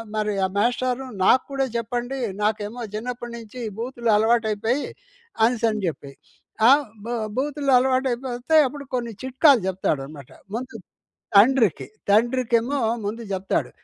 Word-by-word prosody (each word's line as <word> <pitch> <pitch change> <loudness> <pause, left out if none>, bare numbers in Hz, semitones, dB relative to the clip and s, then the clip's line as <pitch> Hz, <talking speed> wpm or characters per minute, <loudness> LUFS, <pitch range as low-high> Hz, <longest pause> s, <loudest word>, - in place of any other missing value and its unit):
మరి 215 -1 0
ఆ - - +1
మాస్టారు 250 +4 0 0.2
నాకు 255 +6 +5
కూడా 275 -1 0
చెప్పండి. 240 +3 -3 0.3
నాకేమో 215 +2 -2
చిన్నప్పటి 240 +2 -5
నుంచి 230 +2 -10 0.2
బూతులు 240 0 -3
అలవాటైపోయాయి 225 +3 +1 0.6
అనేసని 225 -2 +2
చెప్పి. 145 -3 -5 0.6
ఆ! - - +8 0.4
బ - - -7 0.3
బూతులు 285 0 -1
అలవాటైపోతే 255 +1 0
అప్పుడు 280 +2 -8
కొన్ని 235 -2 -2
చిట్కాలు 260 0 +4
చెప్తాడనమాట. 150 -7 -3 0.3
ముందు 245 -1 -5 0.6
తండ్రికి. 225 - +4 0.2
తండ్రికేమో 240 +4 +2 0.3
ముందు 230 +3 -4
చెప్తాడు. 190 0 -1
240 Hz, 115 wpm, -23 LUFS, 215-255 Hz, 0.6 s, ఆ